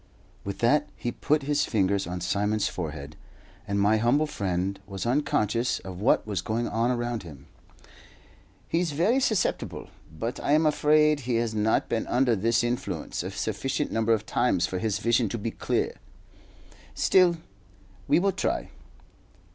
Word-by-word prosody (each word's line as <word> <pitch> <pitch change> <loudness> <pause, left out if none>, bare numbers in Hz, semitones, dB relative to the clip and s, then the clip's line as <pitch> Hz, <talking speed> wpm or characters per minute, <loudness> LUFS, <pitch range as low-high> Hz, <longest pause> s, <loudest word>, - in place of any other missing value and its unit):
With 100 0 -5
that 150 +4 +3
he 120 - -3
put 150 +3 0
his 145 +1 +1
fingers 100 -3 +1
on 90 0 -4
Simon's 105 +3 0
forehead, 75 -5 -6 0.5
and 100 0 0
my 105 +2 +4
humble 120 +7 +2
friend 95 -6 -2
was 100 +1 -5
unconscious 120 -2 +1
of 95 0 -8
what 115 - +3
was 100 -4 -2
going 115 +1 -2
on 115 +2 0
around 120 -2 -1
him. 75 -6 -12 1.2
"He's 165 -2 0
very 205 - +2
susceptible; 220 -8 -1 0.2
but 115 +10 -4
I 145 - +1
am 155 +1 +4
afraid 150 0 +4
he 125 -3 -2
has 115 -1 0
not 110 +1 +1
been 115 - -2
under 125 -1 +2
this 115 +3 +1
influence 120 +1 -3
a - - -4
sufficient 135 +2 -2
number 115 0 +1
of 110 -1 -1
times 105 -8 +1
for 90 0 -3
his 110 -2 0
vision 115 +1 +2
to 120 - -3
be 115 +1 -3
clear. - - -1 1.0
Still, 180 -2 +4 0.7
we'll 195 +3 +3
try. - - -2
115 Hz, 155 wpm, -27 LUFS, 100-140 Hz, 1.2 s, my